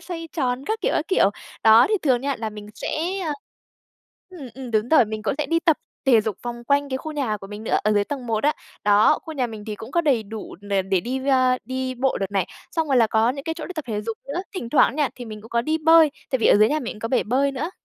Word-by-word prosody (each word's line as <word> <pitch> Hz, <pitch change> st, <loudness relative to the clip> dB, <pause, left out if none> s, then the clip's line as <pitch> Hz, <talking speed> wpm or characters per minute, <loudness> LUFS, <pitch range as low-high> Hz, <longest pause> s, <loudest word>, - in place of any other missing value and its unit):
xoay 335 Hz, -2 st, -7 dB
tròn, 260 Hz, -3 st, -1 dB
các 440 Hz, +1 st, -1 dB
kiểu, -, -, 0 dB
các 310 Hz, -, -1 dB
kiểu. 290 Hz, -, +4 dB, 0.3 s
Đó, 225 Hz, +2 st, +7 dB
thì 430 Hz, -, +2 dB
thường 255 Hz, -5 st, +2 dB
nha, 280 Hz, -1 st, -2 dB
là 220 Hz, -1 st, -3 dB
mình 210 Hz, -1 st, -10 dB
sẽ -, -, -5 dB, 1.4 s
ừm, 300 Hz, -9 st, -9 dB
ừm, 255 Hz, -2 st, -8 dB
đúng 215 Hz, +2 st, +1 dB
rồi, 290 Hz, -6 st, +6 dB
mình 215 Hz, 0 st, -6 dB
cũng 220 Hz, -, -1 dB
sẽ 300 Hz, -, -1 dB
đi 330 Hz, 0 st, +1 dB
tập 320 Hz, -4 st, +3 dB, 0.3 s
thể 235 Hz, -4 st, +6 dB
dục 215 Hz, -3 st, -3 dB
vòng 240 Hz, 0 st, -6 dB
quanh 280 Hz, +2 st, +2 dB
cái 260 Hz, -, -2 dB
khu 310 Hz, +2 st, -6 dB
nhà 255 Hz, -8 st, -1 dB
của 195 Hz, -, -11 dB
mình 210 Hz, +2 st, -8 dB
nữa, -, -, +1 dB
ở 215 Hz, -, +3 dB
dưới 205 Hz, -1 st, +2 dB
tầng 265 Hz, +1 st, -5 dB
một 225 Hz, +2 st, -1 dB
á. 300 Hz, -, +4 dB, 0.3 s
Đó, 205 Hz, +1 st, +5 dB
khu 320 Hz, -, -8 dB
nhà 260 Hz, -4 st, 0 dB
mình 220 Hz, -3 st, -9 dB
thì 210 Hz, -, -4 dB
cũng 225 Hz, +3 st, -10 dB
có 340 Hz, +4 st, +2 dB
đầy 270 Hz, -8 st, +2 dB
đủ 215 Hz, +1 st, -8 dB
đ 200 Hz, 0 st, -8 dB, 0.2 s
để 190 Hz, -2 st, +3 dB
đi 255 Hz, +5 st, -3 dB
ra 260 Hz, -1 st, +3 dB
đi 260 Hz, 0 st, -3 dB
bộ 260 Hz, +2 st, 0 dB
đợt 195 Hz, 0 st, -3 dB
này, 195 Hz, -3 st, 0 dB, 0.3 s
xong 325 Hz, -2 st, -1 dB
rồi 270 Hz, -, +3 dB
là 235 Hz, -2 st, +5 dB
có 220 Hz, +2 st, +2 dB
những 275 Hz, +1 st, -6 dB
cái 325 Hz, -, -2 dB
chỗ 325 Hz, -, -7 dB
đi 370 Hz, -, -6 dB
tập 310 Hz, -4 st, -5 dB
thể 210 Hz, -1 st, -2 dB
dục 225 Hz, 0 st, -5 dB
nữa. 310 Hz, +6 st, -2 dB
Thỉnh 240 Hz, -11 st, -4 dB
thoảng 275 Hz, -, +4 dB
nha, 295 Hz, -4 st, +2 dB
thì 245 Hz, -, -8 dB
mình 215 Hz, -2 st, -8 dB
cũng 225 Hz, -, -12 dB
có 235 Hz, 0 st, +1 dB
đi 310 Hz, +5 st, 0 dB
bơi, 320 Hz, -1 st, +6 dB, 0.2 s
tại 260 Hz, -, +1 dB
vì -, -, +2 dB
ở -, -, +6 dB
dưới 215 Hz, +1 st, +5 dB
nhà 305 Hz, +3 st, 0 dB
mình 240 Hz, -, -5 dB
cũng 210 Hz, -, -13 dB
có 230 Hz, -, -3 dB
bể 255 Hz, -, +2 dB
bơi 275 Hz, +5 st, +1 dB
nữa. 300 Hz, +6 st, -3 dB
255 Hz, 290 wpm, -23 LUFS, 220-290 Hz, 1.4 s, Đó